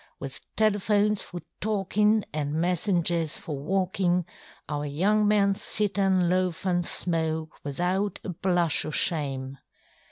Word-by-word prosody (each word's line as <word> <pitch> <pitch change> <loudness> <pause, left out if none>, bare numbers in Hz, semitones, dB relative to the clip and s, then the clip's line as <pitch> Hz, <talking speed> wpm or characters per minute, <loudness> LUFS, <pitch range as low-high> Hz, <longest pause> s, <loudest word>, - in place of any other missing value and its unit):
With 135 -1 -7 0.2
telephones 210 -1 +2
for 175 -1 -7 0.2
talkinŌĆÖ, 210 +1 +2
anŌĆÖ 145 -1 -2
messengers 170 -1 +1
for 150 - -5
walkinŌĆÖ, 180 +1 0 0.4
Our 145 0 -3
young 205 +9 +2
men 200 -1 +4
sit 205 +1 0
anŌĆÖ 190 -3 +2
loaf 180 -1 0
anŌĆÖ 175 -2 +1
smoke, 160 -2 -1
without 180 +7 -1
a - - -5
blush 175 -2 +2
oŌĆÖ 155 - -5
shame. 135 -5 0
180 Hz, 125 wpm, -27 LUFS, 160-200 Hz, 0.4 s, men